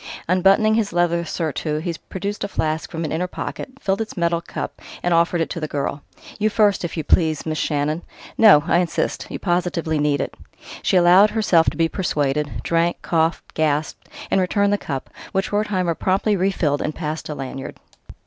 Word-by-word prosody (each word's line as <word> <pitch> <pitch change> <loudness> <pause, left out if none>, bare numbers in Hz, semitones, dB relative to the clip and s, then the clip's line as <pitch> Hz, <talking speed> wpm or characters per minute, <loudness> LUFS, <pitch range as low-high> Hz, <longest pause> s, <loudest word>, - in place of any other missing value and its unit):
Unbuttoning 195 +5 +4
his 220 -2 +1
leather 170 0 +1
surtout, 155 -2 -2
he 170 - -2 0.2
produced 200 +2 -4
a - - -1
flask 160 -4 -2
from 165 0 -4
an 155 - -4
inner 175 +3 -1
pocket, - - -6
filled 195 +2 0
its 220 -2 -6
metal 170 -1 +1
cup, - - -6 0.2
and 175 - +2
offered 170 0 +2
it 165 - -1
to - - -3
the 155 - -3
girl. 145 0 -3 0.4
"You 215 +1 +2
first, 205 -3 +2
if 170 0 -4
you 160 - -1
please, 155 0 +2
Miss 155 -2 -2
Shannon. 150 +2 0 0.3
No 200 -10 +7
I 170 0 +3
insist. 175 -2 -1
You - - -4
positively 175 -3 -1
need 145 -1 +1
it." - - -3 0.5
She 190 - +2
allowed 180 +4 +6
herself 195 -7 +3
to - - -10
be 165 -1 +3
persuaded, 150 -5 -1
drank, 170 +1 0
coughed, 165 0 0
gasped, 155 -1 -1 0.2
and 190 - +3
returned 200 +2 +2
the 205 - +1
cup, 135 -3 -5 0.2
which 190 0 -1
Wertheimer 205 -4 0
promptly 195 +5 +1
refilled 175 -6 0
and 155 - -3
passed 155 -1 -4
to 150 - -5
Lanyard. 135 -1 -6
170 Hz, 185 wpm, -21 LUFS, 155-190 Hz, 0.5 s, No